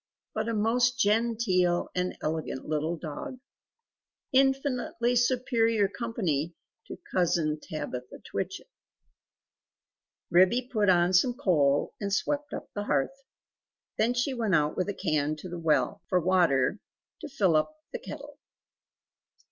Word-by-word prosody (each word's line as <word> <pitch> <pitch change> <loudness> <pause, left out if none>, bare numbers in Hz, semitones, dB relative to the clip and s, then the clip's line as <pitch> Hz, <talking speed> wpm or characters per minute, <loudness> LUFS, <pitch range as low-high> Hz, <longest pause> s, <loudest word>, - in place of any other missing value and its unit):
But 220 +1 -2
a 230 - -1
most 235 +3 +2
genteel 205 -5 +2
and 180 0 -2
elegant 155 -4 -3
little 155 +2 -1
dog 180 - -6 1.0
infinitely 260 -3 +1
superior 235 -3 +2
company 180 - -2 0.3
to - - -7 0.2
Cousin 165 -4 +1
Tabitha 125 -5 -6
Twitchit." - - -4 1.7
Ribby 190 +9 +4
put 210 -3 +3
on 175 0 +4
some 240 +7 +4
coal 150 - +2
and 200 -1 -2
swept 290 +8 -1
up - - -7
the 205 0 -3
hearth. 150 - 0 0.8
Then 235 +3 +2
she 245 +3 0
went 225 -7 +1
out 150 -1 +1
with 185 +2 -1
a 200 - -3
can 155 -4 0
to 155 - -9
the 175 -1 -6
well, 165 +5 +1
for 185 - +3
water 175 -2 +2 0.4
to 305 - -7
fill 195 - +2
up 230 - +1 0.2
the - - -3
kettle. 290 - -9
200 Hz, 130 wpm, -28 LUFS, 165-240 Hz, 1.7 s, Ribby